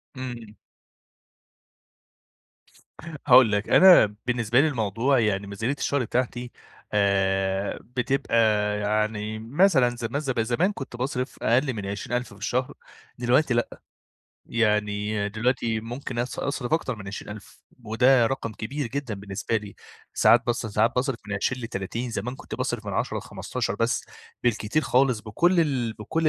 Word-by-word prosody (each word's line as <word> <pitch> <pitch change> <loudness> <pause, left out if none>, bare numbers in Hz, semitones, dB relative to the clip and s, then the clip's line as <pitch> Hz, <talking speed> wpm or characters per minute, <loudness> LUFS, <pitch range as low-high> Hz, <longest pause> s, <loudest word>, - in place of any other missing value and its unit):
امم. 120 -4 -7 2.7
هاقول 125 -4 +7
لك، 105 +1 -1
أنا 175 - +7
بالنسبة 120 0 +2
لي 160 - +3
الموضوع 120 +1 +1
يعني 100 -2 0
ميزانية 110 +8 -2
الشهر 140 -2 0
بتاعتي 125 +1 -2 0.4
آآ، 95 -1 +1
بتبقى 125 +1 -2 0.4
يعني 105 +1 -1
مثلًا 135 - +3
زم 120 +4 -3
ز 135 -3 -2
زمان 125 - +1
كنت 135 -6 -8
باصرف 125 0 -3
أقل 130 +3 +2
من 105 -3 -5
20 100 +5 -3
ألف 125 -4 -6
في 100 - -16
الشهر، 125 +4 -1 0.4
دلوقتي 125 +3 +2
لأ، 120 - -2 0.7
يعني 105 -2 0
دلوقتي 115 0 -1
ممكن 120 +1 -6
أص 125 +2 -3
أصرف 140 -1 -3
أكتر 130 -7 0
من 100 -2 -10
20 100 +1 -6
ألف، 100 - -16 0.2
وده 120 +2 +4
رقم 115 -4 -3
كبير 135 +6 -4
جدًا 130 -3 -4
بالنسبة 100 +3 -3
لي، 105 -2 -6 0.4
ساعات 120 +1 +5
باص 120 -1 -1
ساعات 110 +2 +2
باصرف 130 -1 0
من 100 - -3
20 125 +5 -1
ل30، 115 +2 -4
زمان 115 +4 -4
كنت 145 - -8
باصرف - - -3
من - - -3
10 - - -1
ل15 - - -4
بس - - 0 0.4
بالكتير 120 +5 +1
خالص 125 -3 +2
بكُلّ 170 - +2
ال 130 -7 0
بكُلّ 155 +10 -1
120 Hz, 140 wpm, -25 LUFS, 105-130 Hz, 2.7 s, هاقول